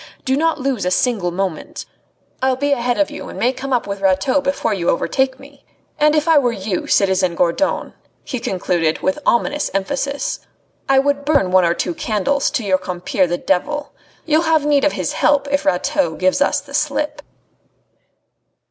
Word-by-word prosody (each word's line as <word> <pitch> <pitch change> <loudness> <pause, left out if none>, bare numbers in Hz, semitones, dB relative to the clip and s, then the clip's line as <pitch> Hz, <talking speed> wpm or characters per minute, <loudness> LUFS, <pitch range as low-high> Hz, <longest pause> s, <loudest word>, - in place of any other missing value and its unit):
Do 265 - +2
not 320 +2 +1
lose 260 -6 -1
a 180 - +1
single 200 -2 +1
moment. 180 -2 -4 0.6
I'll 260 0 +2
be 285 +2 -1
ahead 245 -2 0
of 300 - +1
you - - -8
and - - -9
may 250 +2 +1
come 270 +1 -6
up 245 -2 +1
with 200 -1 -5
Rateau 195 +9 +2
before 275 -5 -1
you 175 -4 -1
overtake 265 +8 0
me. 280 0 -16 0.4
And 300 0 +4
if 305 +1 +1
I 320 -3 +6
were 245 -3 +1
you, 195 -3 -3
citizen 185 -3 +2
Gourdon," 180 - 0 0.3
he 255 - -4
concluded, 175 -6 -1
with 285 +1 0
ominous 290 +5 +1
emphasis, 280 - -2 0.5
"I 270 - +4
would 285 +1 +1
burn 285 -11 +2
one 185 -1 +5
or 170 0 +1
two 175 - -2
candles 225 +10 0
to 235 - -2
your 190 -2 +1
compeer 180 +1 -1
the 175 +1 -1
devil. 195 +13 -1 0.3
You'll 315 0 +3
have 320 -3 +2
need 290 -1 +3
of 295 - +2
his - - -2
help 285 -1 +2
if 285 - 0
Rateau 280 +11 +1
gives 185 +9 +1
us - - +2
the 280 -1 -15
slip." 300 0 -1
260 Hz, 185 wpm, -19 LUFS, 190-285 Hz, 0.6 s, I